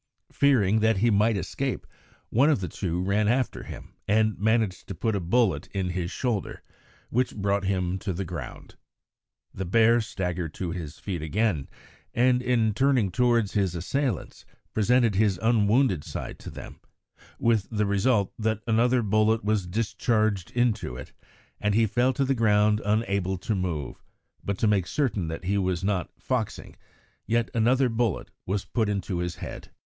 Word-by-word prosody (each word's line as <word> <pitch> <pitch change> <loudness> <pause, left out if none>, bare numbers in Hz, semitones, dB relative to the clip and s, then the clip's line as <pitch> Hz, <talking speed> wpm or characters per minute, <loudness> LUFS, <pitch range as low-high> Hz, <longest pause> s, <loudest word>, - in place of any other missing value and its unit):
Fearing 110 -7 +3
that 110 -1 +3
he 115 +4 +3
might 105 +1 +3
escape, 95 - -3 0.5
one 135 +7 +4
of 145 -10 +2
the 90 - -2
two 90 -1 -3
ran 105 +2 +1
after 125 +2 0
him - - -10
and 110 0 +2
managed 110 -3 +1
to 95 - -5
put 110 +6 -1
a - - 0
bullet 90 -3 +1
in 95 -2 -2
his 90 -1 -2
shoulder, 115 -2 -3 0.5
which 125 +2 0
brought 100 -1 0
him 95 -1 -1
to 95 - -3
the 95 +2 -3
ground. 85 -2 -8 0.8
The 95 - -4
bear 115 +5 +4
staggered 90 -6 -4
to 90 -3 -3
his 80 -4 -6
feet 90 -5 -4
again, 80 -2 0 0.5
and 125 +1 +3
in 120 -3 +2
turning 130 -5 +2
towards 115 -1 +2
his 95 -4 0
assailants 115 - -2 0.3
presented 115 +1 +3
his 100 -1 +2
unwounded 110 - +3
side - - -6
to - - -8
them, - - -10 0.6
with 115 -4 +1
the 105 -2 0
result 100 +1 +1
that 110 -1 -1
another 120 +2 +2
bullet 110 +1 +2
was 105 -3 0
discharged 110 -1 0
into 115 - 0
it, 65 - -9 0.5
and 105 -1 +1
he 115 0 +4
fell 120 +5 +2
to 135 +2 0
the 135 - +2
ground 105 -2 +3
unable 100 -3 0
to 95 +5 -2
move; 90 -7 -3 0.4
but 100 -1 -2
to - - 0
make 100 -4 +2
certain 110 - -1
that 80 +3 -5
he 100 +3 0
was 95 -2 -1
not 95 -3 0
"foxing," 125 -5 -3 0.5
yet 115 0 +1
another 125 +3 +3
bullet 115 -4 -1 0.2
was 100 +1 -1
put 110 -4 0
into 100 -3 -2
his 90 -2 -3
head. - - -8
105 Hz, 165 wpm, -26 LUFS, 95-115 Hz, 0.8 s, one